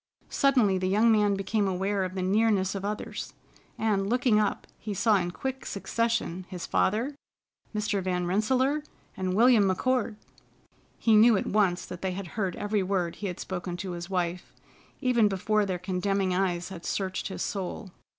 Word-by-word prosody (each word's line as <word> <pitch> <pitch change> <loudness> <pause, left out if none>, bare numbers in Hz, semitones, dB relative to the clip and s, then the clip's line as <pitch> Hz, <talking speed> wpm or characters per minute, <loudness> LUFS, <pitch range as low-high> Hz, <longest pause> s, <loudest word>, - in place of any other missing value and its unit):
Suddenly 245 -9 +3
the 185 - -1
young 215 +4 +4
man 210 -2 +3
became 200 +1 0
aware 190 +1 0
of 185 0 -4
the 185 - -2
nearness 200 -1 +2
of 195 -1 -5
others, 210 +1 -5 0.4
and, 200 -3 0
looking 245 -2 +3
up, 210 -1 0
he 210 -2 -5
saw 215 +1 +4
in 175 -2 -1
quick 265 +8 -5
succession 210 -4 -2
his 180 -2 -5
father, 230 +9 +1 0.6
Mr. 210 -1 0
Van 180 -1 -1
Rensselaer, 260 +10 +1 0.3
and 185 -1 -2
William 230 -1 +6
McCord! 225 +4 +1 0.8
He 225 -2 +3
knew 220 0 +7
at - - -2
once 195 -4 +1
that 180 - -8
they 190 -1 -1
had 185 -1 -6
heard 190 -1 -2
every 205 0 -1
word 185 -3 -1
he 205 - -4
had 180 - -5
spoken 180 -1 -4
to 185 +1 -5
his 175 +1 -6
wife, 180 -1 -2 0.5
even 245 -5 +4
before 205 +1 +1
their 185 -2 -1
condemning 185 +1 -1
eyes 180 -1 0
had 180 -3 -9
searched 190 -1 -2
his 195 - -4
soul. 195 0 -4
195 Hz, 170 wpm, -28 LUFS, 185-215 Hz, 0.8 s, knew